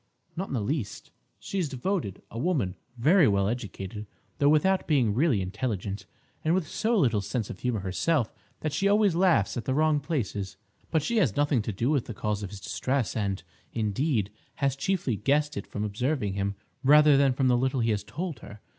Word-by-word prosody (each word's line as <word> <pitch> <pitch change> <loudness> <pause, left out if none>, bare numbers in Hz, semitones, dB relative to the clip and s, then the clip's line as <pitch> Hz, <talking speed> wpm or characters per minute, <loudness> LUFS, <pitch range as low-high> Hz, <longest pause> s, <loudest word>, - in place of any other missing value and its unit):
"Not 190 +3 -3
in - - -3
the 115 - 0
least. 115 -1 -3 0.3
She 195 - -4
is 165 -5 0
devoted; 135 - -2
a 115 - -5
woman 135 - 0 0.2
very 155 +6 +5
well 100 -1 +2
educated, 105 -2 -5 0.3
though 145 -1 +5
without 185 +6 +3
being 130 -9 +3
really 125 - +2
intelligent, 100 0 -3 0.4
and 160 +2 +3
with 185 -5 0
so 225 +7 0
little 120 - +3
sense 110 +2 -3
of - - -9
humour 120 -5 -1
herself 110 - 0 0.3
that 155 -2 -2
she 195 +7 +1
always 205 -2 +4
laughs 165 - +3
at 120 - -4
the 130 - 0
wrong 155 0 +3
places. 115 - -3 0.3
But 160 -3 +1
she 235 +8 0
has 140 - +2
nothing 145 -4 +2
to 105 - -3
do 115 +8 0
with 140 -6 +1
the 115 - -6
cause 105 -1 -2
of 100 - -5
his 100 0 -9
distress; 130 +1 -1
and, 100 -3 -1 0.3
indeed, 110 0 0 0.2
has 140 -2 0
chiefly 140 - -1
guessed 145 +6 +1
it - - -5
from 105 - -4
observing 105 +1 -1
him, 100 0 -2 0.3
rather 150 +1 +7
than 135 -1 +4
from 130 0 +1
what 120 -1 +3
little 130 0 +1
he 115 0 +2
has 100 -1 -1
told 165 - -5
her. 105 - -11
130 Hz, 200 wpm, -27 LUFS, 105-155 Hz, 0.4 s, rather